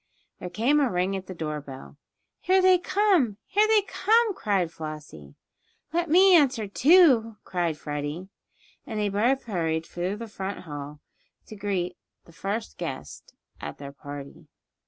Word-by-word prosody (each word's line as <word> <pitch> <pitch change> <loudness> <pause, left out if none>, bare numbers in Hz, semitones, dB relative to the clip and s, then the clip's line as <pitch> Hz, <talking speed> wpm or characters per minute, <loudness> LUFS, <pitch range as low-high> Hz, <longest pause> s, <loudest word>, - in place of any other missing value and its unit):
There 180 - -6
came 235 +11 +2
a 275 -3 +2
ring 180 +2 0
at 190 -1 -6
the 185 - -7
door 150 -2 -4
bell. 135 -1 -11 0.4
"Here 375 +1 +3
they 370 -1 +5
come! 355 - +2
Here 420 +1 +3
they 435 -2 +4
come!" 445 +2 +2
cried 195 - 0
Flossie. 150 - -9 0.6
"Let 345 0 0
me 370 +3 +7
answer, 260 -9 +3
too," 255 - +5
cried 170 -4 -2
Freddie, 150 +4 -5 0.6
and 220 -3 -5
they 210 -1 +1
both 235 +7 +1
hurried 165 -6 -2
through 180 +4 -3
the 230 +2 -7
front 195 -2 -5
hall 145 -2 -8 0.4
to 215 - -10
greet 190 -3 -2 0.3
the 170 - -18
first 205 +6 -4
guest 130 - -7 0.2
at 75 0 -7
their 140 -1 -8
party. 140 0 -10
195 Hz, 155 wpm, -26 LUFS, -, 0.6 s, me